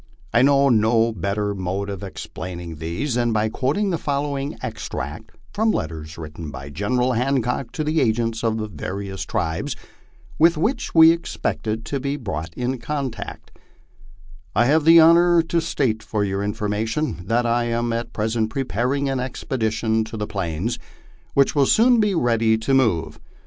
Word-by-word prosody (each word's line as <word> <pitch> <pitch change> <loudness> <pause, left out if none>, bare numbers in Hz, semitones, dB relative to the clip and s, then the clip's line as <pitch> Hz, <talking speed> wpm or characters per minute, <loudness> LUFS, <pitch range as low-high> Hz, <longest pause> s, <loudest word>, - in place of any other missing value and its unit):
I 120 - +5
know 140 +1 +5
no 115 0 +3
better 100 +1 -2
mode 95 +1 -3
of 100 -1 -5
explaining 90 -3 -7
these 85 - -3
than 120 -1 +1
by 110 0 +1
quoting 145 - 0
the 170 - -1
following 140 0 -2
extract - - -5 0.2
from 220 +2 +1
letters 80 - -3
written 80 0 -7
by 70 0 -8
General 125 - 0
Hancock 125 0 0
to 155 - -2
the 155 +1 +1
agents 115 -1 0
of 115 -1 +1
the 110 -1 -3
various 95 +2 -5
tribes 80 0 -2 0.6
with 165 +1 +5
which 230 - -1
we 160 0 +9
expected 115 -9 -3
to 140 - -2
be 140 +1 -2
brought 85 - -5
in 125 +1 -2
contact: 135 0 -5 0.6
" 60 0 -24
I 120 +4 +4
have 150 +4 +3
the 165 +1 +8
honor 170 +1 +6
to 165 +1 0
state 130 -9 0
for 110 -1 -2
your 100 0 -2
information 105 - -2
that 120 +1 +1
I 120 0 +1
am 120 0 -1
at 115 +1 -3
present 110 +1 -1
preparing 135 +2 -1
an 135 -1 -1
expedition 110 -3 -1
to 110 - -7
the 105 - -2
Plains, 95 +2 -3 0.6
which 140 -1 +4
will 140 -3 +3
soon 240 +1 +5
be 210 -3 +2
ready 115 -5 +2
to 110 +5 -1
move. 115 -11 +1
115 Hz, 165 wpm, -22 LUFS, 100-140 Hz, 0.6 s, we